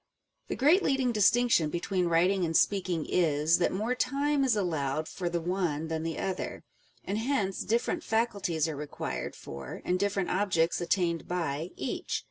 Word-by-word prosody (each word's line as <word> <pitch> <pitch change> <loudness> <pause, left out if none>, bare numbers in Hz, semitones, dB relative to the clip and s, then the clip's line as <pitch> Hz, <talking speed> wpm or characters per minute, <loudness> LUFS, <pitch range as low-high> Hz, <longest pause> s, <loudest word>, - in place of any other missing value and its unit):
The - - -3
great 310 +9 +4
leading 265 -5 +1
distinction 215 -5 +3
between 175 +2 -1
writing 180 +3 +3
and 165 -1 +2
speaking 180 -5 +1
is, 160 -1 +2
that 175 - +2
more 215 +6 -1
time 280 +3 +1
is 255 -4 +3
allowed 155 -6 -1
for 180 -2 -3
the 170 0 -1
one 165 -3 -1
than 160 -1 -2
the 165 0 -3
other; 190 -1 -3 0.4
and 205 +2 -1
hence 225 -6 -1
different 230 +3 0
faculties 200 -8 0
are 160 - -3
required 140 - -5
for, 70 -1 -8
and 180 +1 +1
different 200 -2 0
objects 180 -4 +1
attained 170 -2 0
by, 165 -2 -2
each. - - -3
180 Hz, 160 wpm, -29 LUFS, 165-210 Hz, 0.4 s, great